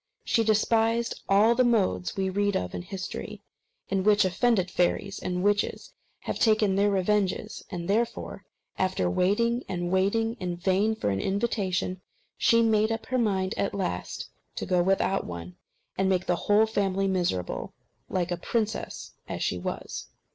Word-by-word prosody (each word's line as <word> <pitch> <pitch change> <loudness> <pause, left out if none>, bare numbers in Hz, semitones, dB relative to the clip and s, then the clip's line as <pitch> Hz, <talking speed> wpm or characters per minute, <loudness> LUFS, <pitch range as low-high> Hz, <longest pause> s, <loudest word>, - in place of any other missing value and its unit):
She 230 - +2
despised 225 +2 +2
all 205 +4 +5
the 255 +2 +3
modes 200 - +1
we 190 -1 +1
read 205 +1 +1
of 90 -1 -4
in - - -4
history, 185 +1 -6 0.4
in 195 -1 0
which 210 0 +5
offended 185 0 +1
fairies 190 +3 0
and 180 0 -2
witches 205 +1 0 0.3
have - - -4
taken 215 -3 +3
their 200 +1 +3
revenges; 205 +1 0
and 175 -3 -5
therefore, 225 -1 -1 0.4
after 185 - +1
waiting 220 - +1
and 175 -1 -2
waiting 225 +5 +1
in 175 -1 -3
vain 195 +5 +1
for 105 - -1
an 95 0 -1
invitation, 190 -3 -1 0.3
she 230 0 +4
made 220 -1 +3
up 225 0 -3
her 255 0 0
mind 195 -4 +1
at 200 - -1
last 90 - -3 0.3
to - - -3
go 180 -1 +2
without 195 +1 +1
one, 85 0 -7 0.4
and 190 0 +2
make 185 -1 +1
the 175 - +2
whole 210 +2 +5
family 195 -3 0
miserable, 175 - -2 0.3
like 180 -1 -1
a 175 - 0
princess 220 +1 -3 0.2
as - - -3
she - - -1
was. - - -5
195 Hz, 160 wpm, -27 LUFS, 185-220 Hz, 0.4 s, all